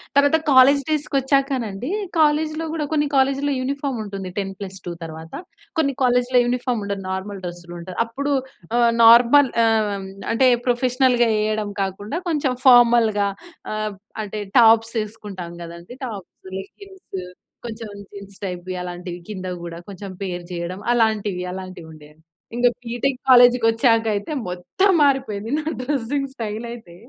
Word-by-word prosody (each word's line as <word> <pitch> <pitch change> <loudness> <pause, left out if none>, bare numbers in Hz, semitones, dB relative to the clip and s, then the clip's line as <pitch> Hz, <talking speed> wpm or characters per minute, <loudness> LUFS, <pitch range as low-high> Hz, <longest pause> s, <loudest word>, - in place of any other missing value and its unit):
తరువాత 285 +3 +5
కాలేజ్ 275 +1 +6
డేస్‌కి 300 -2 -1
ఒచ్చాకనండి. 265 -4 -1 0.3
కాలేజ్‌లో 310 +1 +2
గూడా 310 -2 -2
కొన్ని 300 -1 +2
కాలేజ్‌లో 275 +2 +2
యూనిఫార్మ్ 275 0 -2
ఉంటుంది. 195 -2 -6
10+2 195 -2 -5
తర్వాత. 160 0 -9 0.4
కొన్ని 280 -4 +2
కాలేజ్‌లో 250 0 +3
యూనిఫార్మ్ 245 -2 -1
ఉండదు 200 -1 -4
నార్మల్ 195 +1 -4
డ్రెస్‌లు 175 0 -8
ఉంటాయి. 180 +1 -9
అప్పుడు 280 +5 -3 0.5
ఆహ్, 235 -1 +4
నార్మల్ 240 +4 +7
ఆహ్, 220 -2 +2 0.4
అంటే 260 +3 +4 0.2
ప్రొఫెషనల్‌గా 250 0 +3
ఏయడం 215 -1 -1
కాకుండా 205 - -3
కొంచెం 290 -5 0
ఫార్మల్‌గా 235 -5 +5 0.5
ఆహ్, 215 -1 -3 0.3
అంటే 210 0 -5 0.2
టాప్స్ 225 0 +5
ఏసుకుంటాం 205 -5 -8
గదండీ! 170 +6 -10
టాప్స్, 205 -6 -8 0.2
లెగ్గింగ్స్ 385 - -9 0.5
కొంచెం 220 -1 -7 0.2
జీన్స్ 200 -1 -11
టైప్‌వి 180 0 -5
అలాంటివి 180 0 -7
కింద 185 -2 -6 0.2
గూడా 170 -1 -7
కొంచెం 195 0 -8
పెయిర్ 180 -2 -4
చేయడం 175 +3 -5
అలాంటివి, 210 -5 +1
అలాంటివి 185 -3 -8
ఉండేయండి. 155 +1 -17 0.3
ఇంక 245 - +1 0.2
బీ‌టెక్ 245 +3 -2
కాలేజ్‌కి 245 -1 +7
వచ్చాక 225 0 +3
అయితే 205 +7 -4 0.2
మొత్తం 370 - +1
మారిపోయింది 255 -5 0
నా 305 - -6 0.2
డ్రెసింగ్ 275 +1 -2
స్టైల్ 225 -1 -4
అయితే 200 -8 -12
225 Hz, 130 wpm, -22 LUFS, 195-265 Hz, 0.5 s, నార్మల్